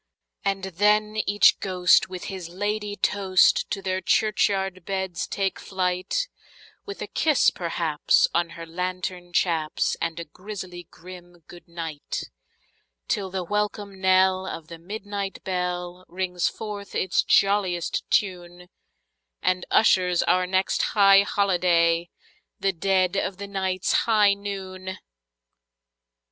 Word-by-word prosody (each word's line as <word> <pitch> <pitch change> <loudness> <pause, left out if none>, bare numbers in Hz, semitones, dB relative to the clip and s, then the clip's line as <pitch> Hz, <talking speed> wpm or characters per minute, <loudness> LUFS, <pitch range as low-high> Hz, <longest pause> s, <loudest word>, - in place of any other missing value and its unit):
And 195 -1 -1
then 210 +3 +1
each 205 +1 +5
ghost 185 -1 +3
with 185 -1 -7
his 185 -4 -6
ladye 205 +3 -3
toast 190 -3 +3
to 195 -2 -4
their 185 0 -1
churchyard 195 -1 +1
beds 190 -3 -3
take 195 -1 -2
flight, 185 - -1 0.6
With 405 - -6
a - - -6
kiss, 310 -4 +3
perhaps, 165 -3 +1
on 170 0 +1
her 165 - -7
lantern 180 +1 -4
chaps, 165 -4 0
and 165 0 -2
a 170 - -5
grisly 185 -1 -9
grim 175 -1 -13
"good 175 0 -14
night"; 165 -3 -5 0.8
Till 195 -2 -1
the 185 0 -3
welcome 205 0 -3
knell 190 0 +3
of 165 -3 -7
the 170 -1 -9
midnight 200 +1 -6
bell 180 -1 -3
rings 180 -1 -1
forth 205 -2 -6
its 185 - +1
jolliest 195 -4 +1
tune, 180 -2 -1 0.7
And 185 0 0
ushers 180 -5 +3
our 180 +1 +2
next 190 +1 +1 0.2
high 195 -1 +7
holiday—the 175 -1 0
dead 185 +1 +1
of 195 -1 -2
the 200 +1 -6
night's 190 -2 -1
high 210 -3 +4
noon! 190 -2 -6
185 Hz, 120 wpm, -25 LUFS, 175-200 Hz, 0.8 s, high